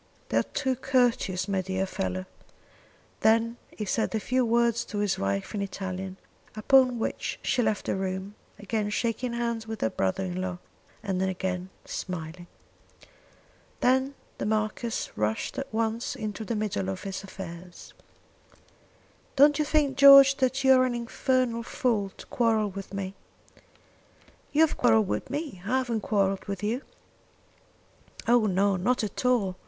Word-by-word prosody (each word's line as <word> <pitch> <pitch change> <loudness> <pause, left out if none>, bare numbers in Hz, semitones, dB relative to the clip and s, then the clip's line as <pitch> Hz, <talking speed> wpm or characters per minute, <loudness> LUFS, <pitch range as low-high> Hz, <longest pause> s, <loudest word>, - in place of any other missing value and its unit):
"They - - +1
are - - +5
too 265 -3 -2
courteous, 245 -8 +1
my 195 -1 0
dear 190 +1 -2
fellow." 95 - -3 0.9
Then 230 +2 +3
he 210 - -6
said 220 +3 -1
a - - +1
few 255 +4 +1
words 235 0 +2
to 210 - -6
his 205 -1 0
wife 100 0 -2
in 205 - -2
Italian, 190 -1 -5 0.4
upon 255 +3 +4
which 225 - -3
she 255 - +1
left 215 -3 0
the - - 0
room, 190 +1 -3 0.2
again 205 +1 -2
shaking 235 +3 -1
hands 235 -1 -2
with 220 -1 -6
her 110 - +1
brother 95 - -1
in 180 0 -3
law, 185 -1 -3 0.5
and 190 -3 -1
again 185 -1 -2 0.2
smiling. 175 0 -6 1.3
Then 260 +2 +2 0.2
the - - -2
Marquis 215 +2 -1
rushed 105 - -2
at 275 - -6
once 225 +1 -1
into 215 0 -5
the 230 +1 -3
middle 205 - -2
of 95 - -5
his 195 0 -5
affairs. 180 -2 -10 1.4
"Don't 290 +2 +6
you 305 - +2
think 290 -3 +1
George 275 0 +9
that 260 +1 0
you 265 0 +7
are 255 0 +5
an 250 -1 -1
infernal 240 0 0
fool 230 -4 -1
to - - -11
quarrel 220 -3 +1
with 195 0 -8
me." 195 -1 -4 1.4
"You 295 - +3
have 320 - +3
quarrelled 225 -4 +4
with - - -3
me. 285 - -4
I 235 +7 +1
haven't 240 -4 -1
quarrelled 195 -2 0
with 200 0 -5
you." 230 +5 -1 1.5
"Oh 235 -2 +4
no; 195 0 +2
not 225 +7 +1
at 210 - -4
all! 205 -8 +2
215 Hz, 155 wpm, -27 LUFS, 190-245 Hz, 1.5 s, George